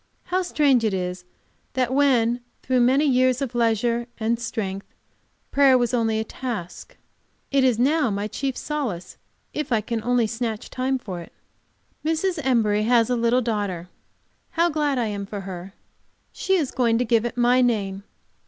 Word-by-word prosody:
How 365 Hz, +1 st, 0 dB
strange 285 Hz, -8 st, +2 dB
it 215 Hz, -3 st, +1 dB
is 180 Hz, -1 st, -4 dB, 0.5 s
that 255 Hz, -1 st, 0 dB
when, 245 Hz, -4 st, +3 dB, 0.2 s
through 255 Hz, 0 st, +1 dB
many 260 Hz, +5 st, +4 dB
years 255 Hz, -2 st, +3 dB
of 275 Hz, -4 st, -3 dB
leisure 235 Hz, 0 st, +1 dB
and 230 Hz, +1 st, 0 dB
strength, 200 Hz, -4 st, -4 dB, 0.6 s
prayer 275 Hz, -2 st, +5 dB
was 245 Hz, -1 st, 0 dB
only 225 Hz, -2 st, +1 dB
a -, -, 0 dB
task, 220 Hz, -7 st, -6 dB, 0.5 s
it 275 Hz, -1 st, +3 dB
is 250 Hz, -4 st, +3 dB
now 285 Hz, +2 st, +2 dB
my 205 Hz, 0 st, -2 dB
chief 270 Hz, +3 st, -3 dB
solace 260 Hz, -, -4 dB, 0.4 s
if 300 Hz, -3 st, -3 dB
I 225 Hz, -, +3 dB
can 225 Hz, +1 st, -3 dB
only 245 Hz, -1 st, +2 dB
snatch 225 Hz, -1 st, -4 dB
time 260 Hz, +1 st, 0 dB
for 190 Hz, -8 st, -6 dB
it. 170 Hz, -, -11 dB, 0.7 s
Mrs. 325 Hz, +3 st, 0 dB
Embury 220 Hz, -5 st, +2 dB
has 230 Hz, +1 st, +3 dB
a -, -, +3 dB
little 235 Hz, +2 st, +2 dB
daughter. 205 Hz, -7 st, -2 dB, 0.6 s
How 340 Hz, +1 st, +2 dB
glad 295 Hz, -3 st, 0 dB
I 240 Hz, -, +1 dB
am 200 Hz, -2 st, -4 dB
for 205 Hz, 0 st, -5 dB
her! 185 Hz, 0 st, -8 dB, 0.6 s
She 385 Hz, -, 0 dB
is 310 Hz, -8 st, 0 dB
going 235 Hz, -3 st, +2 dB
to 250 Hz, -, +1 dB
give 225 Hz, -1 st, +3 dB
it 240 Hz, 0 st, -4 dB
my 245 Hz, +1 st, +4 dB
name. 200 Hz, -6 st, 0 dB
240 Hz, 170 wpm, -24 LUFS, 215-260 Hz, 0.7 s, prayer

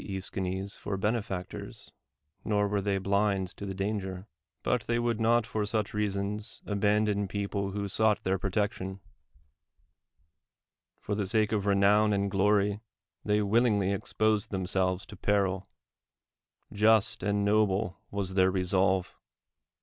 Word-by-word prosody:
yEschines, 95 Hz, 0 st, -3 dB
for 100 Hz, -, -4 dB
benefactors, 100 Hz, -3 st, -4 dB, 0.5 s
nor 105 Hz, -1 st, +1 dB
were 100 Hz, 0 st, 0 dB
they 100 Hz, 0 st, 0 dB
blind 100 Hz, -1 st, +1 dB
to 100 Hz, -, -8 dB
the 95 Hz, -, -3 dB
danger; 95 Hz, -1 st, -3 dB, 0.4 s
but -, -, +1 dB
they 120 Hz, -, +1 dB
would 120 Hz, -1 st, 0 dB
not 115 Hz, 0 st, +3 dB
for 110 Hz, -2 st, -2 dB
such 105 Hz, 0 st, -2 dB
rea 105 Hz, 0 st, +1 dB
DEMOSTHENES 100 Hz, +2 st, -3 dB
sons -, -, -12 dB
abandon 105 Hz, 0 st, +1 dB
people 100 Hz, 0 st, -2 dB
who 100 Hz, +1 st, -3 dB
sought 105 Hz, +1 st, +1 dB
their 95 Hz, 0 st, 0 dB
protec 100 Hz, +2 st, 0 dB
tion; 95 Hz, +1 st, -7 dB, 2.0 s
for 105 Hz, -, -4 dB
the 100 Hz, -1 st, -1 dB
sake 110 Hz, 0 st, +2 dB
of 105 Hz, -2 st, 0 dB
renown 100 Hz, +2 st, +4 dB
and 100 Hz, 0 st, 0 dB
glory 100 Hz, +1 st, +2 dB, 0.4 s
they 105 Hz, 0 st, +2 dB
willingly 105 Hz, -2 st, +2 dB
exposed 110 Hz, +1 st, 0 dB
themselves 95 Hz, -1 st, -1 dB
to -, -, -11 dB
peril; 95 Hz, -1 st, 0 dB, 1.1 s
just 110 Hz, +2 st, +4 dB
and 100 Hz, 0 st, 0 dB
noble 105 Hz, -2 st, +1 dB
was 100 Hz, -2 st, -3 dB
their 95 Hz, -1 st, +4 dB
resolve 95 Hz, 0 st, +1 dB
100 Hz, 135 wpm, -29 LUFS, 95-105 Hz, 2.0 s, renown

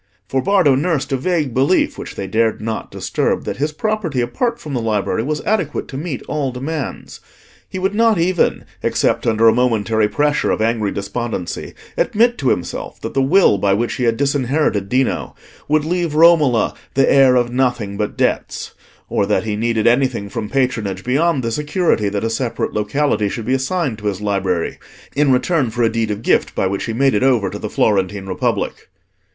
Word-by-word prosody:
For 130 Hz, +4 st, 0 dB
Bardo 185 Hz, -6 st, +3 dB
nursed 150 Hz, +1 st, 0 dB
a -, -, +2 dB
vague 150 Hz, -2 st, -1 dB
belief, 135 Hz, +9 st, +2 dB
which -, -, -8 dB
they 100 Hz, -, -4 dB
dared 110 Hz, +3 st, +1 dB
not 110 Hz, 0 st, -4 dB
disturb, -, -, -1 dB
that -, -, -4 dB
his 150 Hz, +3 st, -1 dB
property, 185 Hz, -, -2 dB
apart 230 Hz, -, -1 dB
from 150 Hz, -8 st, -7 dB
the 125 Hz, -, -1 dB
library, 110 Hz, -1 st, 0 dB
was 150 Hz, +5 st, -2 dB
adequate 185 Hz, -9 st, -1 dB
to -, -, -8 dB
meet 145 Hz, -1 st, -4 dB
all 145 Hz, -3 st, -1 dB
demands. 135 Hz, +4 st, -5 dB, 0.5 s
He -, -, -6 dB
would 190 Hz, +2 st, 0 dB
not 225 Hz, -1 st, +3 dB
even, 175 Hz, +1 st, +1 dB, 0.2 s
except -, -, 0 dB
under 115 Hz, 0 st, +4 dB
a 110 Hz, -, +6 dB
momentary 110 Hz, -3 st, +1 dB
pressure 150 Hz, +3 st, +1 dB
of -, -, 0 dB
angry 110 Hz, -2 st, +1 dB
despondency, 100 Hz, -2 st, -4 dB, 0.2 s
admit 235 Hz, +3 st, +2 dB
to 135 Hz, -4 st, +1 dB
himself 90 Hz, -, -3 dB
that -, -, -5 dB
the 135 Hz, -, +2 dB
will 135 Hz, -, +4 dB
by 100 Hz, 0 st, +2 dB
which 120 Hz, +3 st, -1 dB
he 125 Hz, -, 0 dB
had 115 Hz, -1 st, +1 dB
disinherited 135 Hz, -6 st, 0 dB
Dino 130 Hz, +2 st, 0 dB, 0.3 s
would 150 Hz, 0 st, +2 dB
leave 170 Hz, -2 st, -1 dB
Romola 155 Hz, -7 st, +4 dB, 0.2 s
the 135 Hz, 0 st, +4 dB
heir 135 Hz, -2 st, +5 dB
of 120 Hz, -1 st, +1 dB
nothing 120 Hz, -6 st, 0 dB
but 105 Hz, +1 st, -3 dB
debts; -, -, -1 dB, 0.3 s
or 100 Hz, -, 0 dB
that 105 Hz, -, +1 dB
he 110 Hz, -2 st, -2 dB
needed 115 Hz, 0 st, 0 dB
anything 120 Hz, -4 st, +2 dB
from 105 Hz, +1 st, -4 dB
patronage 125 Hz, -7 st, -1 dB
beyond 140 Hz, +2 st, +1 dB
the 115 Hz, -, -1 dB
security 150 Hz, -, 0 dB
that 100 Hz, +1 st, -3 dB
a 115 Hz, -, 0 dB
separate 120 Hz, 0 st, -2 dB
locality 105 Hz, 0 st, 0 dB
should 115 Hz, +2 st, -5 dB
be 130 Hz, -, 0 dB
assigned 135 Hz, -, -1 dB
to 105 Hz, -, -4 dB
his 100 Hz, -2 st, -2 dB
library, 95 Hz, -4 st, -1 dB, 0.4 s
in 145 Hz, -1 st, +3 dB
return 130 Hz, +1 st, +1 dB
for 120 Hz, +2 st, -1 dB
a 115 Hz, -, +4 dB
deed 115 Hz, -1 st, -1 dB
of 105 Hz, +1 st, -4 dB
gift -, -, +1 dB
by -, -, 0 dB
which 95 Hz, +1 st, -2 dB
he 115 Hz, -, -3 dB
made 135 Hz, +3 st, +2 dB
it 105 Hz, -, +1 dB
over 120 Hz, -7 st, +2 dB
to -, -, -6 dB
the -, -, -4 dB
Florentine 100 Hz, -1 st, 0 dB
Republic. 95 Hz, -1 st, -2 dB
125 Hz, 190 wpm, -18 LUFS, 110-150 Hz, 0.5 s, a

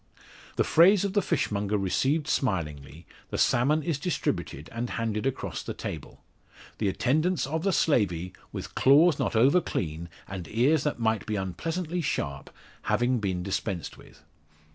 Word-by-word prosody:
The -, -, +2 dB
phrase 190 Hz, +4 st, +5 dB
of 195 Hz, -, -2 dB
the 205 Hz, -, +3 dB
fishmonger 105 Hz, -, 0 dB
received 135 Hz, -, 0 dB
smilingly, 80 Hz, -, -2 dB, 0.2 s
the -, -, -3 dB
salmon 145 Hz, +6 st, +3 dB
is 155 Hz, -3 st, -1 dB
distributed 85 Hz, -, -2 dB
and 120 Hz, +1 st, -3 dB
handed 115 Hz, +1 st, -2 dB
across 135 Hz, -, -3 dB
the -, -, -6 dB
table; -, -, -7 dB, 0.6 s
the 105 Hz, -, +1 dB
attendance 155 Hz, -, +1 dB
of 155 Hz, +4 st, -2 dB
the 195 Hz, +2 st, +1 dB
slavey, 95 Hz, -, +1 dB, 0.2 s
with -, -, -7 dB
claws 150 Hz, +4 st, +5 dB
not -, -, -1 dB
over 135 Hz, +11 st, +5 dB
clean, 85 Hz, -, -4 dB, 0.2 s
and 95 Hz, -3 st, -6 dB
ears 135 Hz, -, +2 dB
that 150 Hz, -, 0 dB
might 110 Hz, -2 st, 0 dB
be 110 Hz, -, -1 dB
unpleasantly 165 Hz, -, -3 dB
sharp, 70 Hz, -, -3 dB, 0.4 s
having 120 Hz, 0 st, +1 dB
been 95 Hz, -4 st, -2 dB
dispensed 95 Hz, -2 st, -3 dB
with. -, -, -18 dB
120 Hz, 150 wpm, -27 LUFS, 95-155 Hz, 0.6 s, phrase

